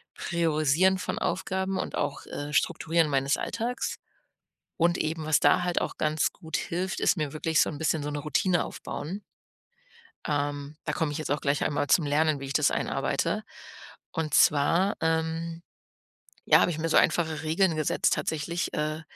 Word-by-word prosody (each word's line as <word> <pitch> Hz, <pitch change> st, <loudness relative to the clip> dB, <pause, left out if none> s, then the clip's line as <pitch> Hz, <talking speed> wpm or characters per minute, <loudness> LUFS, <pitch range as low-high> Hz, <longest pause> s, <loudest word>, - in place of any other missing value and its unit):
priorisieren 165 Hz, +2 st, +2 dB
von -, -, -3 dB
Aufgaben 190 Hz, +1 st, -1 dB
und -, -, -4 dB
auch, 140 Hz, -, -3 dB
äh, 145 Hz, +1 st, -6 dB
strukturieren 160 Hz, +2 st, +1 dB
meines 135 Hz, +1 st, +1 dB
Alltags. 240 Hz, +2 st, -3 dB, 0.8 s
Und 170 Hz, 0 st, +2 dB
eben, 155 Hz, 0 st, -2 dB
was 155 Hz, -2 st, +3 dB
da -, -, +4 dB
halt 175 Hz, -1 st, 0 dB
auch -, -, -4 dB
ganz 155 Hz, 0 st, +1 dB
gut 160 Hz, -4 st, -4 dB
hilft, 185 Hz, +2 st, -3 dB
ist -, -, +3 dB
mir 150 Hz, -3 st, -2 dB
wirklich 160 Hz, +1 st, 0 dB
so -, -, +2 dB
'n 150 Hz, -, -6 dB
bisschen 155 Hz, -1 st, 0 dB
so 145 Hz, -, -3 dB
'ne 145 Hz, -, -3 dB
Routine 175 Hz, +4 st, +1 dB
aufbauen. 185 Hz, +8 st, -6 dB, 1.1 s
Ähm, 145 Hz, 0 st, -2 dB
da 150 Hz, -, -2 dB
komme 155 Hz, 0 st, -1 dB
ich 145 Hz, -, -4 dB
jetzt 155 Hz, -3 st, -4 dB
auch 145 Hz, -, 0 dB
gleich 140 Hz, 0 st, +1 dB
einmal 145 Hz, -1 st, 0 dB
zum 165 Hz, -, +4 dB
Lernen, 150 Hz, +1 st, +2 dB
wie 135 Hz, -, -6 dB
ich 135 Hz, -, -5 dB
das -, -, +3 dB
einarbeite. -, -, -1 dB, 0.7 s
Und 155 Hz, -3 st, -3 dB
zwar, 165 Hz, +7 st, +4 dB
ähm, 165 Hz, +1 st, -1 dB, 0.8 s
ja, -, -, +6 dB
habe -, -, +3 dB
ich 160 Hz, -, -4 dB
mir 165 Hz, +1 st, -2 dB
so -, -, +4 dB
einfache 160 Hz, -2 st, +2 dB
Regeln 165 Hz, +2 st, +2 dB
gesetzt 155 Hz, -2 st, +1 dB
tatsächlich. 160 Hz, +3 st, -2 dB
Äh, 155 Hz, +1 st, -2 dB
160 Hz, 170 wpm, -27 LUFS, 150-170 Hz, 1.1 s, ja